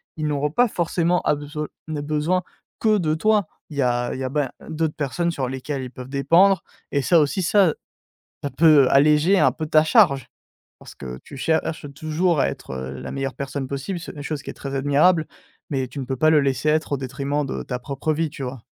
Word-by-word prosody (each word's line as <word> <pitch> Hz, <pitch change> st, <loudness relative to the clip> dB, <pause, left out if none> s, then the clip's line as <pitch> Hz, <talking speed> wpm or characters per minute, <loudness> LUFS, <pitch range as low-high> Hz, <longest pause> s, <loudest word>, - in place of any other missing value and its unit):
ils 155 Hz, -, -3 dB
n'auront 145 Hz, 0 st, 0 dB
pas 245 Hz, +9 st, +2 dB
forcément 170 Hz, -1 st, +1 dB
abesol 150 Hz, +1 st, -2 dB, 0.2 s
né 150 Hz, -2 st, -3 dB
besoin 155 Hz, +5 st, 0 dB, 0.4 s
que 215 Hz, -2 st, +3 dB
de 155 Hz, -2 st, 0 dB
toi. 210 Hz, +1 st, +2 dB, 0.2 s
Il 150 Hz, -, -9 dB
y -, -, +2 dB
a 120 Hz, 0 st, 0 dB
il -, -, -5 dB
y 135 Hz, -, -3 dB
a -, -, -2 dB
ben 140 Hz, -1 st, -1 dB, 0.2 s
d'autres 160 Hz, -1 st, -1 dB
personnes 170 Hz, +4 st, -1 dB
sur 135 Hz, -6 st, -2 dB
lesquelles 135 Hz, +2 st, -4 dB
ils 125 Hz, -, -7 dB
peuvent 130 Hz, 0 st, -9 dB
dépendre 165 Hz, +7 st, +4 dB, 0.3 s
et 140 Hz, -, +1 dB
ça 165 Hz, +4 st, +4 dB
aussi 150 Hz, +6 st, 0 dB
ça 185 Hz, -2 st, +4 dB, 0.7 s
ça 145 Hz, -, -1 dB
peut 155 Hz, -5 st, +6 dB
alléger 150 Hz, +7 st, +4 dB
un -, -, +5 dB
peu 160 Hz, -, -5 dB
ta 155 Hz, 0 st, +5 dB
charge 155 Hz, -, +4 dB, 0.5 s
parce -, -, -13 dB
que 65 Hz, -2 st, -7 dB
tu 140 Hz, -, -11 dB
cherches 160 Hz, +1 st, -1 dB
toujours 155 Hz, +2 st, 0 dB
à -, -, +3 dB
être, -, -, -7 dB
heu, 65 Hz, +1 st, -5 dB
la 65 Hz, -, -6 dB
meilleure 135 Hz, -1 st, -3 dB
personne 135 Hz, -1 st, -4 dB
possible, 140 Hz, +7 st, -4 dB
c'est -, -, -8 dB
une 145 Hz, -, -6 dB
chose 150 Hz, -1 st, -4 dB
qui -, -, -7 dB
est -, -, -9 dB
très 135 Hz, -1 st, -6 dB
admirable, 150 Hz, +5 st, +3 dB, 0.4 s
mais 135 Hz, -3 st, -1 dB
tu 125 Hz, +3 st, -9 dB
ne -, -, -4 dB
peux 130 Hz, -, -2 dB
pas 155 Hz, +4 st, +4 dB
le 155 Hz, -2 st, +5 dB
laisser 140 Hz, +2 st, +1 dB
être 155 Hz, 0 st, 0 dB
au -, -, +2 dB
détriment 140 Hz, +2 st, -2 dB
de -, -, -4 dB
ta 125 Hz, -, -4 dB
propre 140 Hz, +4 st, -2 dB
vie, 160 Hz, 0 st, -1 dB
tu 140 Hz, -, -8 dB
vois? 125 Hz, -2 st, -6 dB
150 Hz, 225 wpm, -22 LUFS, 135-160 Hz, 0.7 s, peut